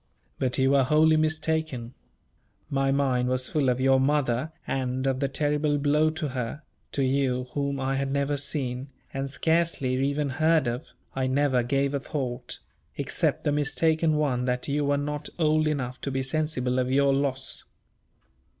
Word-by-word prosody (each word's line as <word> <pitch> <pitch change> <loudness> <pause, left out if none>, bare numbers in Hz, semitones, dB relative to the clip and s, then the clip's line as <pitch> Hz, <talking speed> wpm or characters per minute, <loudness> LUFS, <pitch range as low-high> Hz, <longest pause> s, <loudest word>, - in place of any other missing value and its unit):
But 130 -2 0
you 135 0 +3
were 140 -1 +5
wholly 155 +4 +4
mistaken. 155 -5 0 0.8
My 135 -1 +2
mind 130 -3 +1
was 130 0 0
full 145 -4 +1
of 125 0 +1
your 135 0 +4
mother 135 0 +1
and 130 0 -2
of 135 -1 +1
the 140 - +1
terrible 145 +1 0
blow 150 +2 +3
to 155 -1 -3
her; 130 +4 -4 0.3
to 140 - 0
you, 130 -1 0
whom 140 0 -2
I 135 0 0
had 135 0 -1
never 140 +1 0
seen, 135 -2 -3 0.2
and 135 0 -3
scarcely 160 -3 +1
even 140 +2 0
heard 160 +3 +3
of, 120 +5 -3 0.3
I 130 -1 0
never 130 -1 +2
gave 135 +3 0
a 140 - 0
thought; 130 -3 -4 0.4
except - - 0
the 145 - +1
mistaken 155 +2 +2
one 135 -5 0
that 125 0 -1
you 145 0 0
were 145 0 +2
not 150 +1 -3
old 155 -1 +2
enough 130 -4 -2
to - - -3
be 135 0 -1
sensible 130 -3 -1
of 130 0 0
your 140 0 +4
loss. 135 -1 -2
140 Hz, 170 wpm, -26 LUFS, 130-150 Hz, 0.8 s, were